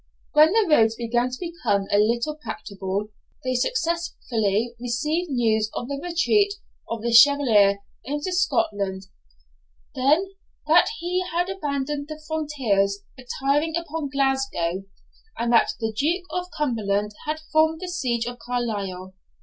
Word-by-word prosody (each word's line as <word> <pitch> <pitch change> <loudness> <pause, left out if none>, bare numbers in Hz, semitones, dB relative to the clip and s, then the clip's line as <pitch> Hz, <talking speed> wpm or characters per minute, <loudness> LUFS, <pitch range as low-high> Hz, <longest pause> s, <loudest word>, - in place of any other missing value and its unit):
When 305 +1 +7
the 445 +1 +3
roads 225 -8 +4
began 240 +1 0
to 255 - -6
become 250 - -1
a 205 - +4
little 235 +7 +1
practicable, 200 - -5 0.3
they 255 0 -1
successively 245 - -1
received 300 +9 -1
news 220 -4 +1
of 240 - -3
the 280 -1 -3
retreat 400 +4 +2 0.3
of 230 -1 -4
the 235 - 0
Chevalier 230 -7 +6 0.2
into 295 +8 -3
Scotland; 205 - 0 0.9
then, 305 +9 +2 0.3
that - - +5
he 360 0 -1
had 350 +2 0
abandoned 285 -4 -3
the 310 0 -7
frontiers, 235 -11 0
retiring 280 +5 -1
upon 325 -3 -4
Glasgow; 265 -10 0 0.5
and 235 +1 0
that 230 - +4
the 225 -1 -2
Duke 335 - 0
of 360 0 -3
Cumberland 210 -8 0 0.2
had 310 +1 -1
formed 315 0 +3
the 365 - -4
siege 250 -10 -1
of 245 0 -6
Carlisle. 205 -7 -3
260 Hz, 135 wpm, -24 LUFS, 220-315 Hz, 0.9 s, When